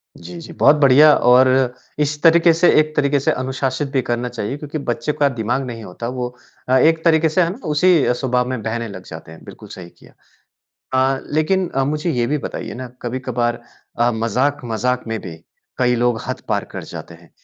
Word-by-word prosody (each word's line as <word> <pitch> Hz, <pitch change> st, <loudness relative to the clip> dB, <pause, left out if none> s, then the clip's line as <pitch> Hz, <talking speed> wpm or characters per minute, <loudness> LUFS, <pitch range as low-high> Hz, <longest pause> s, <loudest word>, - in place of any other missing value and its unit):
जी, 85 Hz, +1 st, -10 dB
जी। -, -, -10 dB
बहुत 145 Hz, -, +5 dB
बढ़िया 145 Hz, +3 st, +7 dB
और 125 Hz, +2 st, +5 dB, 0.5 s
इस 150 Hz, 0 st, -1 dB
तरीक़े 165 Hz, 0 st, +6 dB
से 170 Hz, +2 st, +3 dB
एक 155 Hz, 0 st, 0 dB
तरीक़े 145 Hz, -1 st, +2 dB
से 135 Hz, -, +1 dB
अनुशासित 130 Hz, +2 st, -2 dB
भी 135 Hz, -, +1 dB
करना 120 Hz, 0 st, -2 dB
चाहिए 120 Hz, +2 st, -5 dB
क्योंकि 150 Hz, +1 st, -6 dB
बच्चे 150 Hz, +1 st, -2 dB
का 145 Hz, -, +4 dB
दिमाग़ 120 Hz, +1 st, -2 dB
नहीं 115 Hz, -3 st, -7 dB
होता 105 Hz, +5 st, -7 dB
वो 125 Hz, 0 st, -3 dB, 0.4 s
अ, 130 Hz, -, +4 dB
एक 160 Hz, +4 st, +3 dB
तरीक़े 160 Hz, -1 st, +4 dB
से 160 Hz, +4 st, +1 dB
है 170 Hz, -, +2 dB
ना 200 Hz, -, -7 dB
उसी 155 Hz, -2 st, +3 dB
स्वभाव 125 Hz, 0 st, -1 dB
में 130 Hz, -3 st, -3 dB
बहने 115 Hz, +1 st, -3 dB
लग 95 Hz, -2 st, -9 dB
जाते 80 Hz, 0 st, -10 dB
हैं, 80 Hz, -, -14 dB
बिल्कुल -, -, -12 dB
सही 90 Hz, -2 st, -10 dB
किया। -, -, -21 dB, 1.0 s
अ, -, -, -8 dB
लेकिन 180 Hz, +4 st, +1 dB
अ, 135 Hz, -, +1 dB
मुझे 150 Hz, +4 st, -2 dB
ये 120 Hz, -4 st, 0 dB
भी 150 Hz, +4 st, -1 dB
बताइए -, -, -6 dB
ना 130 Hz, +1 st, -6 dB, 0.2 s
कभी-कभार 120 Hz, -1 st, -2 dB, 0.4 s
अ, 120 Hz, +1 st, +3 dB
मज़ाक-मज़ाक 125 Hz, +1 st, -1 dB
में 115 Hz, 0 st, -2 dB
भी 85 Hz, -3 st, -9 dB, 0.4 s
कई 125 Hz, -1 st, +2 dB
लोग 120 Hz, -1 st, 0 dB
हद -, -, -4 dB
पार -, -, 0 dB
कर -, -, -5 dB
जाते -, -, -9 dB
हैं। 85 Hz, 0 st, -19 dB
130 Hz, 200 wpm, -19 LUFS, 120-150 Hz, 1.0 s, बढ़िया